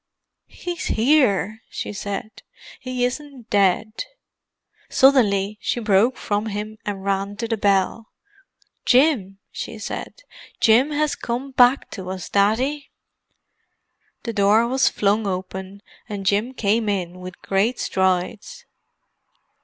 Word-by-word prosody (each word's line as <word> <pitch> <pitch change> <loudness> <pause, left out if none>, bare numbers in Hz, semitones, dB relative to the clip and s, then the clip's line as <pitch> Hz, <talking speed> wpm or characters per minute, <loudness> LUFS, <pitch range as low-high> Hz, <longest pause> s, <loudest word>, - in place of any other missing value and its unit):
"He's 350 -1 -5
here," 220 - +2
she - - -5
said. 205 +1 -6 0.4
"He 255 -2 -1
isn't 265 -2 -6
dead." 205 - +1 0.8
Suddenly 210 -7 +3
she - - -1
broke 220 +3 +3
from 205 +1 -2
him 215 +1 -5
and 195 -2 -4
ran 200 +1 -1
to 230 - -3
the 225 - 0
bell. 200 +2 +1 0.8
"Jim," 245 -8 +3
she - - -6
said; - - -7 0.4
"Jim 235 +6 +5
has 300 0 0
come 250 +3 -4
back 255 +1 +4
to 185 -3 -7
us, 185 -2 -6
Daddy." 250 +9 +1 1.3
The 230 - -4
door 210 +3 +4
was 260 +2 +3
flung 205 +1 +1
open, 190 +1 -5 0.3
and 200 -2 -5
Jim 210 +7 +1
came 215 0 +1
in, 180 -3 -3
with 180 0 -9
great 205 +6 +1
strides. 190 - -1
215 Hz, 120 wpm, -22 LUFS, 195-250 Hz, 1.3 s, Jim